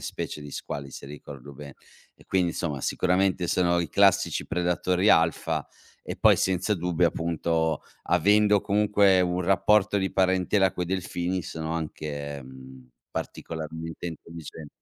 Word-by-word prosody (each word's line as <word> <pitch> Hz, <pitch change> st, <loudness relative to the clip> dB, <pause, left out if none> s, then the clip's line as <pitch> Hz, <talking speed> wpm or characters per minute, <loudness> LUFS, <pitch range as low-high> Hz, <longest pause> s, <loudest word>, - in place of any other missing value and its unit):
specie -, -, -5 dB
di 75 Hz, -1 st, -9 dB
squali 70 Hz, 0 st, -6 dB
se -, -, -9 dB
ricordo 70 Hz, -1 st, -10 dB
be 70 Hz, 0 st, -10 dB, 0.4 s
e -, -, -21 dB
quindi 90 Hz, -2 st, +1 dB
insomma 75 Hz, -5 st, -3 dB
sicuramente 90 Hz, +3 st, +1 dB
sono 85 Hz, -1 st, +2 dB
i 85 Hz, -, -3 dB
classici -, -, +3 dB
predatori 90 Hz, +2 st, +1 dB
alfa 80 Hz, -1 st, +2 dB, 0.4 s
e -, -, -6 dB
poi -, -, +5 dB
senza 95 Hz, +3 st, +1 dB
dubbio, 90 Hz, -1 st, +1 dB
appunto, 80 Hz, -1 st, -1 dB, 0.2 s
avendo 105 Hz, 0 st, +4 dB
comunque 100 Hz, -2 st, +3 dB
un 90 Hz, 0 st, 0 dB
rapporto 105 Hz, +3 st, +3 dB
di 95 Hz, -1 st, -1 dB
parentela 95 Hz, +1 st, +2 dB
coi 90 Hz, -, -3 dB
delfini 90 Hz, 0 st, -2 dB
sono 80 Hz, +1 st, -5 dB
anche, 75 Hz, -3 st, -5 dB
mhmm, 65 Hz, 0 st, -13 dB, 0.2 s
particolarmente 80 Hz, +1 st, -6 dB
intelligen 80 Hz, -2 st, -9 dB
85 Hz, 135 wpm, -26 LUFS, 75-95 Hz, 0.4 s, poi